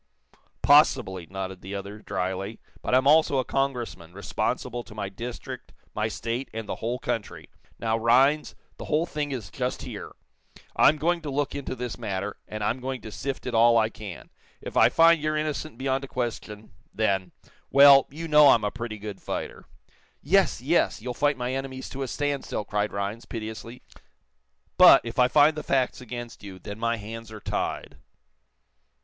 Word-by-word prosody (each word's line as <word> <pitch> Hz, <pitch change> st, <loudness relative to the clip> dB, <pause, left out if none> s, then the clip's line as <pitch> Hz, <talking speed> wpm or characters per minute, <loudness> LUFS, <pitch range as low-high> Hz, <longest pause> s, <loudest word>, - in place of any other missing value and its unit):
"Possibly," 125 Hz, -, +4 dB
nodded 95 Hz, 0 st, -6 dB
the 95 Hz, +2 st, -6 dB
other, 100 Hz, +2 st, -7 dB
dryly. 95 Hz, +1 st, -4 dB, 0.2 s
"But -, -, +1 dB
I'm 130 Hz, +1 st, +3 dB
also 150 Hz, -1 st, +5 dB
a 130 Hz, -, +1 dB
Congressman, 120 Hz, -12 st, -3 dB
responsible 120 Hz, +4 st, -3 dB
to 105 Hz, -, -13 dB
my 100 Hz, -2 st, -4 dB
district, 115 Hz, +5 st, -8 dB, 0.2 s
my 110 Hz, +1 st, -1 dB
state 115 Hz, +4 st, -4 dB
and 110 Hz, -1 st, -5 dB
the -, -, -4 dB
whole 120 Hz, +3 st, -2 dB
country. 115 Hz, -3 st, -5 dB, 0.3 s
Now, 115 Hz, 0 st, 0 dB
Rhinds, 135 Hz, +6 st, +3 dB, 0.2 s
the -, -, -7 dB
whole 155 Hz, +3 st, +1 dB
thing 150 Hz, -4 st, -3 dB
is 110 Hz, -8 st, -5 dB
just 125 Hz, +2 st, -3 dB
here. -, -, -7 dB, 0.6 s
I'm 155 Hz, -, +5 dB
going 170 Hz, +3 st, 0 dB
to 155 Hz, -, -5 dB
look 145 Hz, +1 st, -1 dB
into 140 Hz, -2 st, -4 dB
this 125 Hz, -2 st, -5 dB
matter, 100 Hz, +1 st, -4 dB
and 110 Hz, -1 st, -5 dB
I'm 115 Hz, +5 st, 0 dB
going 130 Hz, -1 st, -4 dB
to 110 Hz, -, -9 dB
sift 135 Hz, +4 st, -5 dB
it 125 Hz, -, -3 dB
all 115 Hz, +1 st, +5 dB
I 110 Hz, -1 st, +3 dB
can. 105 Hz, -5 st, -10 dB, 0.3 s
If -, -, -8 dB
I -, -, +6 dB
find 165 Hz, -1 st, +5 dB
you're 155 Hz, 0 st, 0 dB
innocent 155 Hz, -3 st, -3 dB
beyond 135 Hz, +1 st, -1 dB
a -, -, -6 dB
question 110 Hz, -4 st, -5 dB, 0.2 s
then 95 Hz, -4 st, 0 dB, 0.4 s
well, 140 Hz, 0 st, +8 dB
you 165 Hz, +4 st, -7 dB
know 150 Hz, -1 st, +7 dB
I'm 115 Hz, -, +5 dB
a 105 Hz, -, 0 dB
pretty 115 Hz, -2 st, -6 dB
good 105 Hz, -1 st, -8 dB
fighter." -, -, -5 dB, 0.5 s
"Yes, -, -, +2 dB
yes; -, -, +1 dB
you'll 125 Hz, +2 st, -5 dB
fight 145 Hz, +2 st, +1 dB
my 125 Hz, +1 st, -2 dB
enemies 130 Hz, -1 st, -5 dB
to 135 Hz, -, -6 dB
a 135 Hz, -, -2 dB
standstill," 140 Hz, -5 st, -2 dB
cried 105 Hz, 0 st, -1 dB
Rhinds, 100 Hz, +3 st, -4 dB
piteously. 115 Hz, +2 st, -7 dB, 1.0 s
"But, -, -, +9 dB
if 115 Hz, +3 st, -5 dB
I 125 Hz, -, +6 dB
find 150 Hz, +4 st, +5 dB
the 155 Hz, -, -4 dB
facts 130 Hz, -3 st, 0 dB
against 120 Hz, -1 st, -8 dB
you, 95 Hz, -2 st, -9 dB
then 100 Hz, +3 st, -8 dB
my 115 Hz, 0 st, 0 dB
hands 110 Hz, +1 st, -8 dB
are 110 Hz, -, -8 dB
tied." -, -, -4 dB
120 Hz, 180 wpm, -26 LUFS, 105-135 Hz, 1.0 s, But